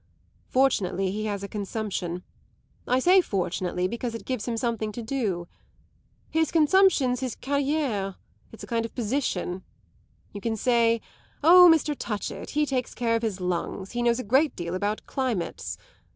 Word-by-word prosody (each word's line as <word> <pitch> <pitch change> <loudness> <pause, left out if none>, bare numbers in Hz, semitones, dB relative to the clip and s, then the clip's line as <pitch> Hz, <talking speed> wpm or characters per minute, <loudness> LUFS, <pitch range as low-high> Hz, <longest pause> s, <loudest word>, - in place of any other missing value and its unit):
Fortunately 195 -8 +1
he 215 +2 -3
has 200 -2 -3
a - - -4
consumption; 200 -4 -4 0.6
I 250 - +3
say 365 +8 +5
fortunately, 180 - -1
because 235 +2 -4
it 230 - -8
gives 255 -4 -3
him 235 -1 -1
something 225 -3 -1
to 235 - -6
do. 215 -9 -2 0.8
His 320 -1 +1
consumption's 315 -6 +4
his 255 -3 -3
carriere 275 -8 -1 0.4
it's 225 - -11
a - - -5
kind 230 -1 -1
of 230 - -7
position. 215 -7 -1 0.7
You 205 - -7
can 225 +1 -1
say: 230 -1 +3 0.4
'Oh, 355 +2 +9
Mr. 310 -2 +2
Touchett, 210 -6 -5
he 300 - +4
takes 260 -3 -2
care 230 -2 +1
of 230 - 0
his 215 -5 -2
lungs, 180 +2 -3
he 240 - -2
knows 235 -1 +3
a 255 - -3
great 270 +8 +2
deal 170 0 -4
about 205 +3 -2
climates. 180 - -3
230 Hz, 160 wpm, -26 LUFS, 195-265 Hz, 0.8 s, Oh